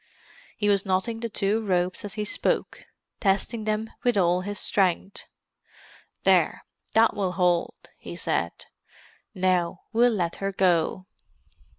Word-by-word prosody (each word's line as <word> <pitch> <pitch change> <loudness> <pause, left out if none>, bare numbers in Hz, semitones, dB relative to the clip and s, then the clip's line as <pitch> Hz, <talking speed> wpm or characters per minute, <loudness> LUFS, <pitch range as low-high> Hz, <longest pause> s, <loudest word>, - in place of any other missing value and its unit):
He 210 - 0
was 200 -1 +3
knotting 195 +4 -1
the 230 0 -3
two 210 +2 0
ropes 180 -2 0
as 205 0 -6
he 210 -1 -2
spoke, - - -1 0.3
testing 210 +3 0
them 215 +1 -1
with 245 -3 +2
all 180 -1 +3
his 205 +2 -5
strength. 195 0 0 1.0
"There—that 225 0 +2
will 190 -3 -1
hold," 180 -2 +1 0.2
he - - -8
said. - - -2 0.7
"Now 180 -1 +1
we'll 240 +2 +5
let 175 -5 -1
her 195 0 -2
go." 185 -1 +1
195 Hz, 125 wpm, -26 LUFS, 185-215 Hz, 1.0 s, we'll